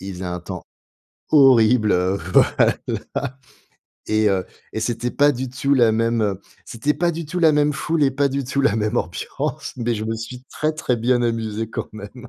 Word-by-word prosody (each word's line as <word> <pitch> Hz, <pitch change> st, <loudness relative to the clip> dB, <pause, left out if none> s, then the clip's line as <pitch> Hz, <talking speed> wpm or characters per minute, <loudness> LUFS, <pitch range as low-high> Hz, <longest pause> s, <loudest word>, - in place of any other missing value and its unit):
Il 95 Hz, +1 st, -6 dB
faisait 90 Hz, +1 st, -7 dB
un 90 Hz, 0 st, -4 dB
temps 90 Hz, +1 st, -8 dB, 0.7 s
horrible, 125 Hz, -6 st, +5 dB, 0.4 s
voilà. -, -, +4 dB, 1.3 s
Et 110 Hz, 0 st, +2 dB
heu, 95 Hz, -2 st, 0 dB, 0.3 s
et 110 Hz, -, -2 dB
c'était 120 Hz, +2 st, -2 dB
pas 145 Hz, 0 st, +4 dB
du 130 Hz, 0 st, -4 dB
tout, 140 Hz, +3 st, -1 dB
la 120 Hz, -4 st, +5 dB
même, 115 Hz, +1 st, +1 dB
heu, 100 Hz, -2 st, -1 dB, 0.3 s
c'était 120 Hz, +6 st, -1 dB
pas 170 Hz, +3 st, +1 dB
du 165 Hz, +1 st, -5 dB
tout 180 Hz, +4 st, -4 dB
la 160 Hz, -2 st, +5 dB
même 150 Hz, 0 st, +2 dB
foule 155 Hz, +2 st, -1 dB
et 135 Hz, -, +3 dB
pas 140 Hz, +1 st, +1 dB
du 140 Hz, 0 st, -2 dB
tout 135 Hz, +2 st, -1 dB
la 135 Hz, -6 st, +2 dB
même 110 Hz, +2 st, -1 dB
ambiance! 85 Hz, +1 st, -4 dB
Mais, 120 Hz, -1 st, -1 dB
je 110 Hz, 0 st, -4 dB
me 110 Hz, +1 st, -2 dB
suis 125 Hz, +3 st, -8 dB
très, 155 Hz, 0 st, -1 dB
très 140 Hz, -5 st, -1 dB
bien 120 Hz, +2 st, +1 dB
amusé 115 Hz, -2 st, -2 dB
quand -, -, -4 dB
même! 110 Hz, +4 st, -10 dB
120 Hz, 195 wpm, -21 LUFS, 110-140 Hz, 1.3 s, horrible